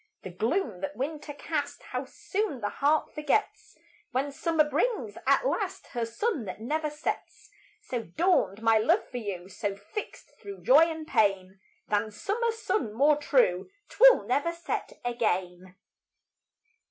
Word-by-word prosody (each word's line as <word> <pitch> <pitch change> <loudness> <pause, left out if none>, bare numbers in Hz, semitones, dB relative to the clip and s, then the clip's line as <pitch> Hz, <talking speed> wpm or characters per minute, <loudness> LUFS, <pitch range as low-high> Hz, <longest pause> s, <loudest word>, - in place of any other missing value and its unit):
The 185 - -7
gloom 220 - -1
that 195 0 -4
winter 295 +4 -4
cast, 290 0 -4
How 255 +1 -4
soon 385 - -3
the 205 -2 -2
heart 295 +2 +1
forgets, 300 +7 -1 0.3
When 275 +3 -1
summer 310 +1 +1
brings, 465 +9 -1
at - - +4
last, 385 -6 -2
Her 235 -2 -2
sun 280 - -2
that 185 +1 -6
never 300 +7 -1
sets! 300 +1 -5 0.3
So 245 -2 -3
dawned 220 - +1
my 225 -1 +5
love 335 - +2
for 250 - -4
you; 195 -6 -5
So, 200 0 -3
fixt 205 - -8
thro' 400 -1 -8
joy 290 +6 +7
and 320 -1 -6
pain, 195 -6 +1 0.3
Than 210 +1 +1
summer 420 - -1
sun 420 - -2
more 290 +4 +4
true, 250 - +2 0.2
'Twill - - +7
never 285 +7 +1
set 340 0 -4
again. 185 -6 -2
275 Hz, 145 wpm, -28 LUFS, 210-330 Hz, 0.3 s, joy